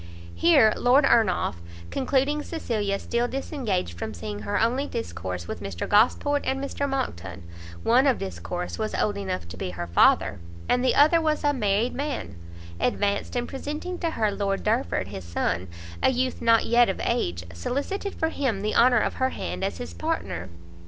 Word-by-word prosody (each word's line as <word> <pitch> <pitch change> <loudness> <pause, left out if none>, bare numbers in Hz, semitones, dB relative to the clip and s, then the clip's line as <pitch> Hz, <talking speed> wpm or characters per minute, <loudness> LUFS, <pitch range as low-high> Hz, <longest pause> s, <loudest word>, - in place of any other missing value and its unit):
Here 280 -11 +5
Lord 265 +4 +4
Ernolf, 215 - +2 0.3
concluding 275 +3 +1
Cecilia 220 -11 -2
still 235 +4 -1
disengaged 225 - -3
from - - -4
seeing 105 +4 -5
her 105 -1 -1
only 255 +5 +1
discourse 90 - -5
with - - -5
Mr 100 -4 -4
Gosport 270 +7 +3
and 265 +1 -1
Mr 280 +1 -2
Monckton, 95 - -4 0.4
one 255 +4 +4
of 260 - +3
them 195 -1 -4 0.5
was 215 0 -2
old 205 - +1
enough 90 - -4
to 85 +1 -9
be 90 - -3
her 85 -1 -5
father, 85 +2 +3 0.3
and 245 - +2
the 260 - +3
other 310 +3 +5
was 310 -1 0
a 290 0 +3
married 215 -1 +1
man, 275 - -4 0.4
advanced, 200 - 0
and 245 0 -1
presenting 300 +6 -5
to 335 - 0
her 220 -9 0
Lord 200 -1 -1
Derford, 215 - 0
his 95 -2 -7
son, 85 +1 -2 0.3
a - - +5
youth 255 0 -1
not 230 -1 +4
yet 240 -1 +4
of 190 - -2
age, 85 - -1
solicited 285 - -3
for 320 - 0
him 255 -10 -1
the 210 +1 -1
honour 240 -1 +5
of - - 0
her 260 - +3
hand 90 - -5
as - - -2
his 80 0 -7
partner. 85 +1 -3
225 Hz, 175 wpm, -25 LUFS, -, 0.5 s, Here